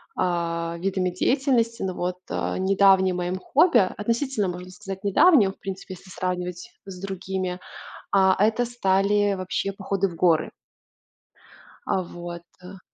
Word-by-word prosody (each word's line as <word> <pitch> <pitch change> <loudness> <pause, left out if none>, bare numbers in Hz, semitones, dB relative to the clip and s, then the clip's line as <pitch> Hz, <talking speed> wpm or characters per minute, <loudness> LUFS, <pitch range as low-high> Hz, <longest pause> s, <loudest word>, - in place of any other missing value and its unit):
а, 170 -1 -1
видами 185 0 0
деятельности. 235 +4 +1
Но 190 -1 -2
вот, 180 0 -3
э, - - -2
недавним 190 -1 +4
моим 180 +1 -2
хобби, 325 - +4 0.2
относительно 230 0 -1
можно 180 0 -6
сказать 195 -1 -8
недавним, 205 - +5
в - - -20
принципе, 195 0 -7
если 185 - -16
сравнивать 180 -1 -4
с 185 -2 -9
другими, 190 -1 -4 0.5
а, 190 -1 +4
это 225 +3 +2
стали 205 -3 +1
вообще 185 +1 -2
походы 195 0 -1
в 170 - -10
горы. 165 -2 +2 1.4
А, 190 - +1
вот, 175 -1 -8 0.2
да. 185 +1 -11
190 Hz, 135 wpm, -24 LUFS, 180-200 Hz, 1.4 s, недавним